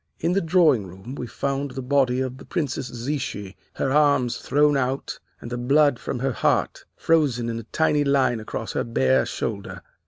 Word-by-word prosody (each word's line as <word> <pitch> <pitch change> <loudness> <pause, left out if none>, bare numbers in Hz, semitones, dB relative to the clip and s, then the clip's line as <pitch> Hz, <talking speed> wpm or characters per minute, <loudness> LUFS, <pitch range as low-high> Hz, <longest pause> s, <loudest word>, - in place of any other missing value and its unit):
In 170 +2 0
the 195 - +2
drawing 160 - +3
room 95 +8 -10
we 125 -3 -5
found 140 +3 -2
the 130 +1 -6
body 130 -1 +2
of 130 0 -4
the - - -12
Princess 140 -6 -2
Zichy, 120 -6 -4 0.2
her 135 - -1
arms 140 -4 +3
thrown 145 0 +2
out, 135 0 -2 0.2
and 120 - -9
the 120 - -3
blood 140 +1 +3
from - - -4
her 135 +2 -1
heart - - 0
frozen 140 -8 +1
in 115 0 -3
a - - -8
tiny 150 -2 +1
line 135 -4 +2
across 110 +1 -5
her - - 0
bare 65 - +2
shoulder. - - -5
130 Hz, 185 wpm, -24 LUFS, 120-145 Hz, 0.2 s, drawing